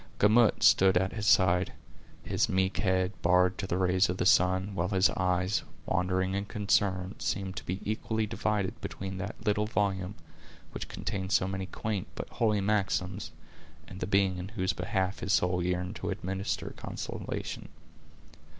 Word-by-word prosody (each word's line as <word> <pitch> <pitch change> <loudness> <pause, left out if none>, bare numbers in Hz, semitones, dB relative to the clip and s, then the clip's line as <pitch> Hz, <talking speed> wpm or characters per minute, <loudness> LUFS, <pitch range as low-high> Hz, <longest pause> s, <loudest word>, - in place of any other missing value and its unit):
Gamut 110 +2 +4
stood 95 -1 +6
at 95 +1 0
his 105 -1 -3
side, 90 -2 +4 0.5
his - - 0
meek 95 +1 +1
head 95 -2 +1
bared 90 +1 +3
to 100 - -3
the 90 - -1
rays 95 0 +3
of 90 - -1
the - - 0
sun, 95 +2 +3
while 90 -1 -1
his 95 -1 +3
eyes, 90 +2 0 0.2
wandering 95 +1 0
and 100 +1 -2
concerned, 100 -3 0
seemed 95 -1 -2
to - - -4
be 95 +2 -3
equally 110 +1 -1
divided 105 -3 -2
between 95 0 -5
that 100 +3 -4
little 105 0 +1
volume, 100 -3 -1 0.6
which - - -6
contained 95 -1 -4
so 90 0 +3
many 95 0 -3
quaint 105 -3 -3
but - - -5
holy 105 -3 +1
maxims, 95 -1 -1 0.6
and 95 +2 -9
the - - -3
being 95 -2 +2
in 90 - -5
whose 95 -3 -1
behalf 95 -3 -1
his 100 - -1
soul 90 0 +2
yearned 90 0 -2
to - - -4
administer 95 +2 -3
consolation. - - -5
95 Hz, 160 wpm, -30 LUFS, 90-100 Hz, 0.6 s, stood